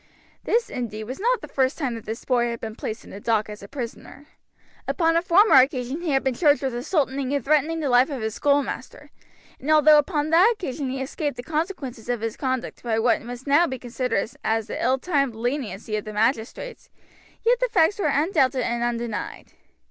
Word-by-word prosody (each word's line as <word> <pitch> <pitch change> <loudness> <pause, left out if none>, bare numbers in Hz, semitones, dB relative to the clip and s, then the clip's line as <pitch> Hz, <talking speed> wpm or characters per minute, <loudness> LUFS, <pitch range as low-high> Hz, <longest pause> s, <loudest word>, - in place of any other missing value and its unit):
This 465 +1 +1
indeed, 220 -3 -4
was 255 - -7
not 485 +4 +1
the - - -8
first 260 -1 0
time 270 -6 -2
that 230 -2 -8
this 220 +1 -5
boy 240 -2 +2
had 235 -1 -4
been 220 -1 -6
placed 220 - -5
in - - -14
the 200 - -8
dock 215 0 0
as 210 - -9
a 200 - -10
prisoner. 265 +3 -8 0.6
Upon 330 -2 +2
a 335 - +4
former 380 +5 +5
occasion 260 +2 +2
he 345 - -3
had 270 -2 +2
been 265 -1 +1
charged 290 +1 +3
with 265 -2 -1
assaulting 270 0 -1
and 280 - -2
threatening 310 +2 +2
the 295 - -1
life 250 +2 +4
of 270 -6 -4
his 220 -1 -2
schoolmaster, 285 +1 -1 0.5
and 280 - -6
although 305 -1 +7
upon 300 0 -1
that 370 +8 +6
occasion 285 -8 -4
he 265 - -3
had 265 - -2
escaped 290 +2 -4
the 245 - -6
consequences 300 - -4
of 240 -3 -1
his 225 -1 -3
conduct 260 -2 -3
by 230 -2 -1
what 230 +1 +2
must 245 +2 -8
now 295 +5 +4
be 260 - -4
considered 245 -3 -2 0.2
as 225 0 0
the - - -5
ill 260 +1 +3
timed 275 -5 0
leniency 225 -4 -3
of 210 - -2
the 215 - -7
magistrates, 230 - -2 0.6
yet 480 +1 +4
the - - +1
facts 370 +1 +3
were 390 - +1
undoubted 280 -3 +2
and 235 0 -1
undenied. 235 -2 -4
265 Hz, 210 wpm, -24 LUFS, 235-305 Hz, 0.6 s, although